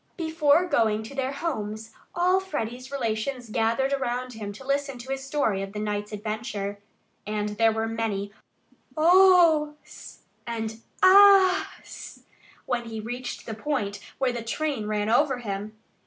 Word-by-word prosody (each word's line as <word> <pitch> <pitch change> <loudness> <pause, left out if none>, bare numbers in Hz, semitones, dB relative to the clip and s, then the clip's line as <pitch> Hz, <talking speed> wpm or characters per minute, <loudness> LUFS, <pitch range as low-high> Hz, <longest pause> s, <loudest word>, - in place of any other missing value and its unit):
Before 320 -1 +2
going 220 -9 +1
to 220 - -10
their 270 -1 -2
homes 220 -8 -4 0.2
all 365 +2 +3
Freddie's 255 -8 -5
relations 240 -1 -3
gathered 230 +5 +1
around 255 -2 -2
him 210 -2 -6
to 265 +6 -12
listen 275 -1 -1
to 250 +2 -8
his 270 0 -3
story 270 -8 0
of 195 0 -6
the 210 - -4
night's 210 0 -3
adventure. 210 -1 -4 0.5
And 210 0 -2
there 225 +2 +2
were 220 0 -1
many 215 -3 -3 0.6
"Ohs" 335 -3 +3 0.2
and 225 -1 -4 0.2
"Ahs" 390 0 +4 0.4
when 245 -2 -2
he 225 -1 -6
reached 245 +3 -6
the 225 - -5
point 215 -4 -3 0.2
where 260 -2 0
the 240 - -4
train 245 -1 -2
ran 210 -1 -1
over 265 +4 +3
him. 210 -2 -6
240 Hz, 140 wpm, -26 LUFS, 215-290 Hz, 0.6 s, Ahs